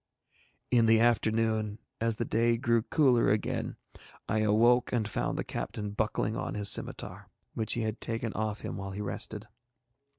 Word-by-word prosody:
In 120 -2 +4
the 110 0 +6
afternoon, 110 -2 +1 0.2
as 115 0 0
the 115 - -2
day 115 +1 +2
grew 115 -1 +2
cooler 125 -1 +3
again, 105 0 -1 0.5
I 110 - +1
awoke 115 +4 +4
and 115 -4 0
found - - -2
the - - -1
captain 105 -1 -4
buckling 110 +1 -1
on - - -3
his 105 -1 +1
scimitar, - - -3 0.2
which 110 - 0
he 120 - -1
had 110 0 -3
taken 115 -1 -2
off 110 -1 -2
him - - -5
while 95 0 -5
he 100 - -4
rested. 105 +1 -3
110 Hz, 165 wpm, -30 LUFS, 105-115 Hz, 0.5 s, the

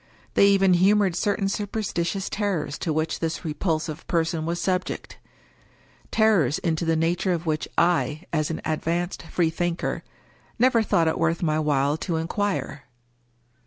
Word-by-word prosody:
They 200 - +5
even 195 -2 +4
humored 190 0 +3
certain 200 +1 0
superstitious 195 -3 -2
terrors 195 -9 -2
to 165 - -2
which 155 +1 -1
this 165 0 -3
repulsive 155 0 -2
person 165 -2 0
was 170 +1 -1
subject 185 +1 -2 0.5
— - - -32
^terrors 195 - +3
into 165 0 -1
the 165 0 +2
nature 170 +3 +1
of 170 0 -3
which 155 -1 -1
I, 170 -2 +2
as 155 -2 +1
an 165 - -4
ad 155 -1 -1
vanced 175 +2 -2
freethinker, 170 0 -1 0.5
never 245 -1 +4
thought 170 -6 +2
it 160 - 0
worth 165 +1 +1
my 155 -1 +1
while 145 -1 +1
to 165 +1 -3
inquire. 165 -4 -2
170 Hz, 150 wpm, -25 LUFS, 160-190 Hz, 0.5 s, They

